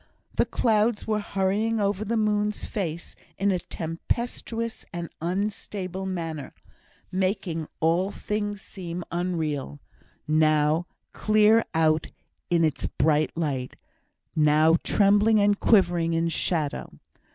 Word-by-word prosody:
The - - +1
clouds 220 -1 +1
were 215 -1 0
hurrying 205 +3 0
over 200 0 0
the 230 +2 -1
moon's 210 -1 0
face 170 -5 -4 0.2
in 200 +1 +2
a 180 - 0
tempestuous 230 +8 -4
and 170 -1 -5
unstable 190 +1 -3
manner, 165 -6 -5 0.6
making 185 -4 -1
all 170 +4 +2
things 205 -1 -3
seem 175 -2 -6
unreal; 160 -5 -2 0.5
now 155 +2 +3 0.3
clear 215 +1 +4
out 160 -1 +3 0.4
in 170 -1 +3
its 155 -3 0
bright 155 0 +1
light, 140 -6 -2 0.6
now 155 +1 +5
trembling 205 +2 +4
and 205 0 +3
quivering 175 -6 +3
in 165 0 +1
shadow. 160 -3 -1
185 Hz, 110 wpm, -26 LUFS, 160-210 Hz, 0.6 s, now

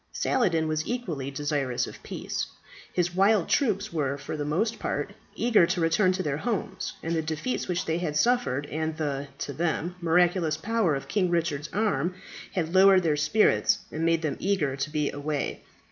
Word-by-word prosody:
Saladin 165 -10 +1
was 155 0 -1
equally 175 - -3
desirous 140 -3 -1
of - - -11
peace. - - -4 0.4
His 175 -1 0
wild 195 0 +3
troops 215 - +1
were, 140 -4 -1
for 140 +2 -6
the 150 - -3
most 185 +10 0
part, - - -2 0.2
eager 225 -8 +4
to 180 +1 -1
return 170 +4 +3
to 185 0 -2
their 145 -3 -1
homes, 195 -2 -3
and 165 - -1
the 160 - +1
defeats 160 +10 -3
which 180 -1 -1
they 165 +1 0
had 160 -4 -2
suffered, 235 - +2
and 155 +1 -2
the, 145 -3 -2
to 140 - -4
them, 170 +2 -1
miraculous 170 -1 +2
power 220 -8 +1
of 135 - -5
King 190 -3 +1
Richard's 165 -4 -1
arm, 180 -5 0 0.4
had 170 -2 -1
lowered 190 0 +7
their 155 -3 +2
spirit 150 +9 +3
and 155 - -3
made 165 0 +2
them 155 - -1
eager 170 -9 0
to 135 +2 -3
be 150 -1 0
away. 145 0 -3
165 Hz, 180 wpm, -27 LUFS, 150-190 Hz, 0.4 s, lowered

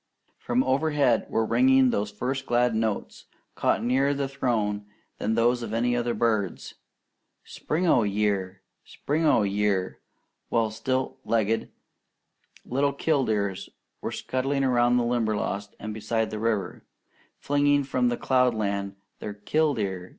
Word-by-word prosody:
From 250 +2 +1
overhead 140 -3 +2
were 110 - +1
ringing 130 +2 +4
those 105 -1 -1
first 130 +6 -4
glad 120 0 +2
notes, 110 -2 -2 0.3
caught - - 0
nearer 135 +4 +2
the 140 -1 -1
Throne 110 -6 -1 0.3
than 110 +1 0
those 120 +2 +2
of 115 -1 -4
any 120 +1 +1
other 120 -1 -1
bird, 110 -6 0 0.8
"Spring 165 +4 -3
o' 145 -8 +4
year! 100 -2 -1 0.2
Spring 155 +3 -1
o' 115 - +4
year!"; 100 -2 0 0.5
while 115 -2 +1
stilt 130 +4 -2
legged 110 0 0 1.0
little 140 +3 0
killdeers 110 - 0 0.3
were - - -3
scudding 135 +2 -1
around 120 -1 +3
the 120 - +2
Limberlost 110 -4 -1
and 105 +1 -5
beside 110 +1 -1
the 110 - -4
river, 110 -3 -2 0.5
flinging 145 0 +2
from 130 -2 +1
cloudland 110 -7 0 0.2
their 105 -1 -6
"Kill 150 +8 +1
deer! 95 -4 -3
115 Hz, 130 wpm, -26 LUFS, 105-130 Hz, 1.0 s, ringing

